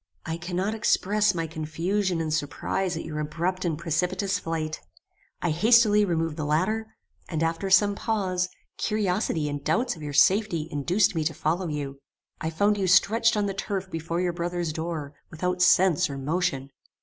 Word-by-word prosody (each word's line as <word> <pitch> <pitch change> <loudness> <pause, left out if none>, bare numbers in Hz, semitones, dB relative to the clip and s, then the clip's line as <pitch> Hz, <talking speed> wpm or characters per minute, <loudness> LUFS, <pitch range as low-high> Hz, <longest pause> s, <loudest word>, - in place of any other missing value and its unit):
"I 160 0 -3
cannot 180 +4 -2
express 210 -2 +2
my 165 -1 -1
confusion 165 +4 -1
and 155 -1 -2
surprize 165 +4 -2
at - - -5
your 155 -1 -5
abrupt 170 +5 -2
and 165 -4 -1
precipitate 180 +4 -1
flight. 165 -4 -2 0.6
I 170 - +1
hastily 210 +3 +5
removed 165 -3 -1
the 155 - -2
ladder; 215 +9 -1 0.3
and, 160 -2 -1
after 165 +4 -1
some 200 +2 +5
pause, 190 -4 -1 0.3
curiosity 190 -6 0
and 145 -1 -4
doubts 240 - +1
of 160 - -12
your 145 -1 -5
safety 175 +1 +3
induced 175 +7 +2
me 160 -2 -1
to 160 -1 -1
follow 170 +5 -1
you. 140 -3 -4 0.4
I 160 - -2
found 205 +6 +1
you 190 - 0
stretched 220 +5 +4
on 205 - +1
the 195 - -2
turf 195 -1 -4
before 165 +1 -3
your 180 -1 0
brother's 175 -1 -2
door, 160 -3 -4 0.2
without 180 +2 -2
sense 180 -1 +4
or 140 - -5
motion. 140 -2 -1
175 Hz, 170 wpm, -26 LUFS, 160-195 Hz, 0.6 s, hastily